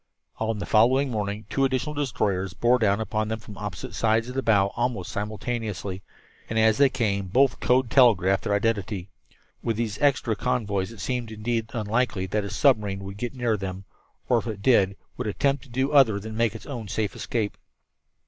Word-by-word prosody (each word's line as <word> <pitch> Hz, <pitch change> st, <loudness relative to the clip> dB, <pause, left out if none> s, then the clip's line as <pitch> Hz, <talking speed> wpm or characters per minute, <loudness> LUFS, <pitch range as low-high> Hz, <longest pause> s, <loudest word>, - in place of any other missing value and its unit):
On 110 Hz, 0 st, -1 dB
the 100 Hz, -, -4 dB
following 130 Hz, +5 st, +3 dB
morning 105 Hz, -1 st, -3 dB
two 135 Hz, -, 0 dB
additional 135 Hz, +3 st, 0 dB
destroyers 100 Hz, -, -1 dB
bore 125 Hz, +1 st, +3 dB
down 100 Hz, -2 st, +2 dB
upon 110 Hz, -1 st, -1 dB
them 110 Hz, +1 st, -2 dB
from 105 Hz, -1 st, -11 dB
opposite 100 Hz, -4 st, -6 dB
points 115 Hz, +1 st, +1 dB
off -, -, -6 dB
the 135 Hz, -, -1 dB
bow 100 Hz, -5 st, +3 dB
almost 120 Hz, -6 st, -2 dB
simultaneously, 105 Hz, -2 st, -4 dB, 0.5 s
and 110 Hz, -, -2 dB
as 110 Hz, +1 st, +4 dB
they 140 Hz, -1 st, +6 dB
came 100 Hz, -7 st, -1 dB
both 130 Hz, +7 st, +3 dB
code 125 Hz, -1 st, +2 dB
telegraphed 100 Hz, -8 st, +4 dB
their 100 Hz, -, +1 dB
identity. 100 Hz, -3 st, -1 dB, 0.5 s
With 115 Hz, -2 st, -1 dB
these 110 Hz, -3 st, -3 dB
extra 130 Hz, -6 st, +2 dB
convoys 105 Hz, -5 st, -1 dB
it 110 Hz, -4 st, -10 dB
seemed 120 Hz, 0 st, -3 dB
indeed 110 Hz, +1 st, -2 dB
unlikely 110 Hz, -3 st, 0 dB
that 105 Hz, +3 st, -1 dB
a 100 Hz, -, -5 dB
submarine 105 Hz, -9 st, +2 dB
would 100 Hz, 0 st, -7 dB
get 120 Hz, +4 st, -4 dB
near 120 Hz, -3 st, +1 dB
them, 95 Hz, 0 st, -6 dB, 0.4 s
or, 120 Hz, -, +3 dB
if -, -, -7 dB
it 105 Hz, -3 st, -5 dB
did, 100 Hz, -6 st, +4 dB, 0.2 s
would -, -, -3 dB
attempt 140 Hz, +6 st, 0 dB
to -, -, -19 dB
do 130 Hz, +3 st, 0 dB
other 130 Hz, -8 st, +5 dB
than 110 Hz, +2 st, -7 dB
make 115 Hz, -1 st, +1 dB
its 110 Hz, -, -9 dB
own 120 Hz, -6 st, -6 dB
safe 105 Hz, +1 st, -2 dB
escape. 110 Hz, -4 st, -2 dB
110 Hz, 190 wpm, -25 LUFS, 100-125 Hz, 0.5 s, they